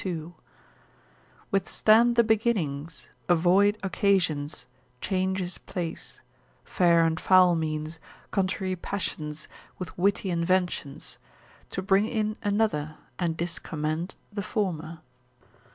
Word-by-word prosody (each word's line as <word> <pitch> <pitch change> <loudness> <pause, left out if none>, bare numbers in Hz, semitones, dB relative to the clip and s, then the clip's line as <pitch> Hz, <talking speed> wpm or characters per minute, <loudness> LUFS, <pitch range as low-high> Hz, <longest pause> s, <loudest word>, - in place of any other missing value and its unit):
II.—_Withstand 195 +5 -1
the 235 - +6
beginnings, 190 -10 -1 0.2
avoid 185 +5 +4
occasions, 160 - 0 0.3
change 190 +3 0
his 180 -1 -3
place: 175 -4 -5 0.4
fair 170 -3 +4
and 160 0 0
foul 185 -2 +6
means, 155 0 -3 0.3
contrary 190 -1 0
passions, 155 -5 -4 0.3
with 180 -3 -7
witty 195 0 +1
inventions: 175 -4 -1 0.5
to 190 - -4
bring 195 +2 +3
in 215 -2 -1
another, 205 -8 0 0.2
and 165 -3 -1
discommend 160 0 -3 0.2
the 200 - -2
former_. 170 -6 -3
180 Hz, 95 wpm, -27 LUFS, 160-200 Hz, 0.5 s, the